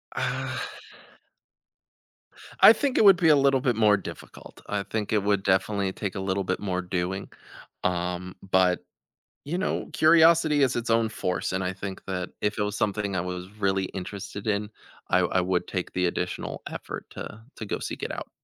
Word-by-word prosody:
Uh - - -2 2.0
I - - +10
think 280 -3 -1
it - - +5
would 195 -2 +9
be 165 -1 +4
a 150 - +7
little 135 -2 +3
bit 125 -3 +1
more 105 -2 +4
difficult; 95 - -10
I 105 -1 -1
think 110 +1 -3
it 105 -2 +2
would 100 -1 +1
definitely 100 0 +1
take 100 0 -5
a - - -3
little 95 0 -1
bit 95 0 -2
more 95 -3 -2
doing. 90 +1 -3 0.5
Um, 90 0 -2 0.2
but, 90 -1 +4 0.7
you 165 +5 -2
know, 190 - -2
curiosity 160 -2 +5
is 130 - +2
its 120 -1 -2
own 115 0 +3
force, 90 -5 -2
and 95 0 -1
I 90 - -1
think 95 0 -7
that 90 -1 -3
if 105 +1 -1
it 105 - +1
was 105 0 -2
something 100 -2 -1
I - - +1
was 90 +1 -5
really 95 -2 +1
interested 100 +2 -7
in, 105 0 0 0.4
I 90 - +4
w 90 - 0
I 95 - +4
would 90 0 0
take 90 -2 -4
the 90 0 +1
additional 85 - -3
effort - - -7
to 110 - -8
to 110 - -6
go - - -2
seek - - -6
it - - -2
out. - - -7
100 Hz, 190 wpm, -26 LUFS, 95-110 Hz, 2.0 s, I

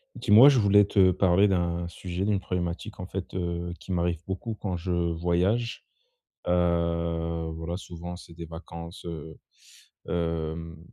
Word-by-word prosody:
Dis-moi, 115 +7 +8
je 140 - +4
voulais 100 0 +6
te 95 -2 +4
parler 95 +2 +4
d'un 85 -2 0
sujet, 90 +2 -4
d'une 105 -2 +2
problématique 90 +3 -4
en 90 - -4
fait, 95 0 -6
heu, 85 -1 -2
qui - - -9
m'arrive 85 -2 0
beaucoup 95 +4 -4
quand 95 -3 -2
je 90 +1 -4
voyage. 90 +7 0 0.6
Heu, 85 -1 0
voilà 80 +2 -4
souvent, 90 -2 -7
c'est 85 - -13
des 85 0 -8
vacances 85 +1 -9
heu, 80 -2 -7 0.7
hem, 80 -1 -2
85 Hz, 145 wpm, -27 LUFS, 85-95 Hz, 0.7 s, Dis-moi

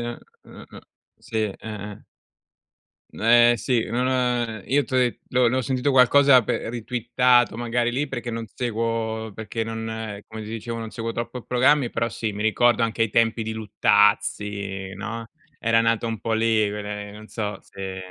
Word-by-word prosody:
uh-uh, 120 0 -10 0.4
sì, 110 - -8
eh-eh. 105 0 -7 1.1
N - - -11
eh, 120 +1 +6
sì, 115 +2 0
non 120 +3 0
ha 125 -4 0
io 140 +1 +2
t'ho 130 - -2
de 125 -2 +1
l'ho 125 -1 +3
l'ho 130 +1 0
sentito 130 +2 0
qualcosa 135 0 +6
pe 115 +1 -2
ritwittato 120 0 +2
magari 120 0 0
lì 135 +5 -1
perché 120 -3 -5
non 115 -1 -4
seguo 115 -2 -2
perché 110 +1 -4
non 110 -2 -5
come 110 0 -8
ti 105 - -8
dicevo, 115 +1 -5
non 115 -1 -6
seguo 115 0 -4
troppo 120 +2 -5
programmi, 130 +2 +3
però 115 0 -2
sì, 110 -2 -3
mi 105 +1 -4
ricordo 120 +2 +3
anche 115 0 0
i 115 - +2
tempi 115 +1 +2
di 110 0 -4
Luttazzi, 105 -2 +1
no, 110 +3 -6 0.3
era 115 0 +3
nata 115 0 +1
un 115 -2 -4
po' 115 -1 -1
lì 110 -1 +2
quelle 105 0 -5
non 110 +1 -12
so 105 -3 -4
se 95 -1 -7
115 Hz, 165 wpm, -24 LUFS, 110-120 Hz, 1.1 s, eh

